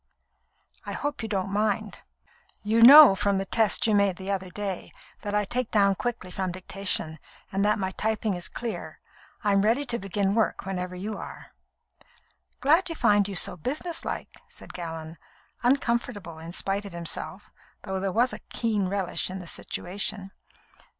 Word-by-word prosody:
I - - -6
hope 290 -2 -3
you 225 - -4
don't 195 -2 -1
mind. 210 0 -1 0.6
You 220 +2 +2
know, 280 0 +11
from 200 0 +1
the 195 - -1
test 220 +1 +2
you 220 - +3
made 200 -2 +3
the 190 +2 -5
other 190 -2 -2
day, 195 -1 -4 0.3
that 205 -1 -3
I 210 0 +2
take 245 +3 -2
down 200 -3 +4
quickly 225 -3 -4
from 185 0 -2
dictation, 185 -3 -3 0.3
and 195 +1 0
that 210 +2 +3
my 190 -2 -2
typing 220 +1 -1
is 175 -1 -5
clear. 235 -2 -6 0.4
I 205 - +2
am 195 0 +4
ready 230 +8 +2
to 240 -2 -1
begin 195 0 0
work 225 0 0
whenever 180 -1 -4
you 205 +4 -5
are." - - -9 1.1
"Glad 325 +7 +4
to 330 - -3
find 205 -7 +3
you 200 - -5
so - - 0
businesslike," 305 - -4
said - - -13
Gallon, 165 -2 -7 0.4
uncomfortable 235 - 0
in 165 +1 -8
spite 195 +2 -1
of 200 - -8
himself, 170 -1 -4 0.3
though 190 -1 -3
there 195 0 -1
was 240 +5 +2
a - - -6
keen 215 -5 0
relish 190 -2 -1
in 185 - -5
the 180 - -8
situation. 195 +3 -3
200 Hz, 170 wpm, -27 LUFS, 190-225 Hz, 1.1 s, know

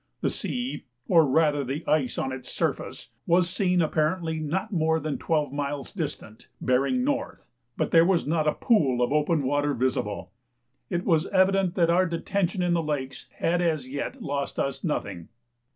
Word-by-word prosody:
The - - +1
sea, 250 +1 -4 0.2
or 165 -4 +5
rather 145 0 +2
the 140 +5 -4
ice 145 -5 +1
on 135 - -1
its 130 -1 -7
surface, - - -3 0.2
was 175 +1 +4
seen 180 -1 +1
apparently 160 +1 0
not 185 +8 -2
more 160 -2 +2
than 155 -2 -3
twelve 150 -4 0
miles 145 -1 -4
distant, 150 - -6
bearing 140 - +1
north; 280 +1 -2 0.3
but - - -1
there 165 0 +7
was 175 -1 +2
not 155 +1 0
a 150 - +3
pool 135 - +2
of 120 +3 0
open 150 0 +2
water 145 +1 +1
visible. 120 -5 -2 0.6
It 175 0 -2
was 165 -1 +2
evident 190 -1 +2
that 170 -2 +3
our 185 +2 +3
detention 180 +2 -1
in 175 -1 +2
the 170 - +2
lakes 145 -4 -4
had 175 +2 +1
as 155 -6 0
yet 145 - -5
lost 140 -2 -3
us 135 -1 -2
nothing. 100 - -3
160 Hz, 170 wpm, -26 LUFS, 140-175 Hz, 0.6 s, there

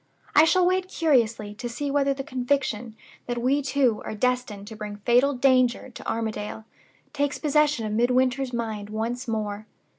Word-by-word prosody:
I 310 - +8
shall 355 +3 +4
wait 370 +1 +1
curiously 230 - +1
to 240 +3 -6
see 280 +4 -3
whether 280 -1 +2
the 270 0 -3
conviction 250 -4 -2 0.3
that 240 0 -2
we 260 +4 +2
two 265 -5 +1
are - - -5
destined 250 -3 -1
to 220 - -8
bring 210 -1 -6
fatal 245 +7 +3
danger 255 -1 +2
to - - -7
Armadale 220 -1 -4 0.5
takes 285 0 -1
possession 300 -5 +2
of 210 - -3
Midwinter's 250 +3 +2
mind 220 -4 -4
once 230 +4 -3
more. 215 -1 -3
245 Hz, 160 wpm, -25 LUFS, 220-275 Hz, 0.5 s, I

